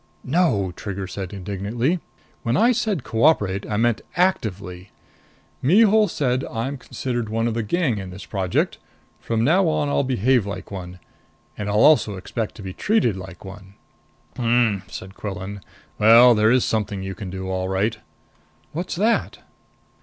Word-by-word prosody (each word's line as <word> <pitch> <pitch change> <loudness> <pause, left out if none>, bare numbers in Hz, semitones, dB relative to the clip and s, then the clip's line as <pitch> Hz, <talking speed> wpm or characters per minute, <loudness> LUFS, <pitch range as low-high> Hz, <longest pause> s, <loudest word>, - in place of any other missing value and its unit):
"No!" 130 - +1
Trigger 100 -2 -5
said 95 -1 -6
indignantly. 105 - -2 0.4
"When 120 +2 0
I 235 +3 +5
said 215 - -1
cooperate, 110 -6 +1
I 105 - -1
meant 115 0 +1
actively. 100 - -1 0.7
Mihul 210 - +5
said 130 -6 -1
I'm 130 +4 -4
considered 120 -3 -4
one 115 +1 0
of 115 - -1
the 115 - -1
gang 125 - 0
in 95 -1 -7
this 90 +2 -9
project. 95 -3 -1 0.4
From 115 -1 -1
now 175 +8 +4
on 150 -2 0
I'll 140 - +2
behave 125 -3 +1
like 95 -1 -6
one. 90 -2 -7 0.6
And 105 0 -4
I'll 105 +1 +2
also 145 -9 +5
expect 105 +3 -4
to 105 - -10
be 95 -1 -6
treated 205 - +1
like 95 -2 -10
one." 95 0 -11 0.6
"Hm," 115 -4 +2
said 95 -2 -9
Quillan. 100 0 -6 0.4
"Well, 115 +3 +8
there 110 0 +3
is 125 +1 +3
something 105 -3 -2
you 95 0 -4
can 100 -1 -7
do, 95 0 -5
all 95 0 -2
right." 95 +4 0 0.7
"What's 175 +4 -4
that?" 220 +6 +1
110 Hz, 155 wpm, -22 LUFS, 95-130 Hz, 0.7 s, Well